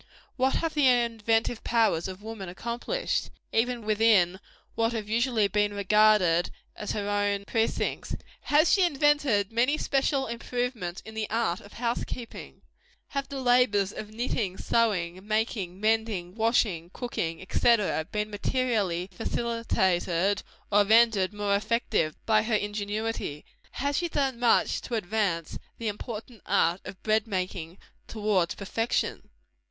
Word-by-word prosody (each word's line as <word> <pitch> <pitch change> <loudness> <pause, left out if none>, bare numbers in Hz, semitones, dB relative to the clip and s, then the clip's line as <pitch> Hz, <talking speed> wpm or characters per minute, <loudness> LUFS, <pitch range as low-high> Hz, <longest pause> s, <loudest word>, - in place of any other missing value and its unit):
What 265 +1 +1
have 330 -1 -1
the 295 -3 +4
inventive 230 -2 +1
powers 225 -8 +2
of 190 +2 -8
woman 215 -4 -6
accomplished, 235 - -2 0.2
even 235 0 0
within 210 -4 +3 0.3
what 230 +1 0
have 220 -2 -3
been 215 - -4
usually 235 -3 +2
regarded 205 -3 +3 0.3
as 210 - -4
her 205 -1 -3
own 205 -1 0
precincts? 225 +2 -1 0.3
Has 305 +3 +4
she 395 - +4
invented 290 - +2
many 250 +6 +2
special 275 -1 +1
improvements 235 -5 -3
in 220 - -9
the 220 -1 -3
art 220 -6 0
of 205 - -15
house 235 0 -1
keeping? 235 -2 -8 0.5
Have 275 -1 -3
the 280 -1 -5
labors 245 -6 +3
of 210 - -7
knitting, 215 -4 -2
sewing, 185 -7 0
making, 215 -4 -1
mending, 215 -5 0
washing, 220 -6 +1
cooking, 180 -7 -4
&c., 235 +3 +4 0.4
been 210 0 -2
materially 205 -5 0
facilitated, 195 -4 0 0.3
or 205 0 +5
rendered 220 -3 +4
more 205 -1 0
effective, 210 -6 0
by 215 -1 +4
her 220 0 0
ingenuity? 205 -5 -3 0.3
Has 280 +1 -1
she 345 -1 -2
done 270 -5 -1
much 240 -1 +3
to 240 - -4
advance 195 -5 -1 0.2
the 230 - -4
important 215 +1 -7
art 170 +3 +2
of 190 - -9
bread 220 +1 +2
making 185 -3 -4 0.3
towards 205 -5 0
perfection? 225 +4 -2
215 Hz, 135 wpm, -27 LUFS, 200-235 Hz, 0.5 s, or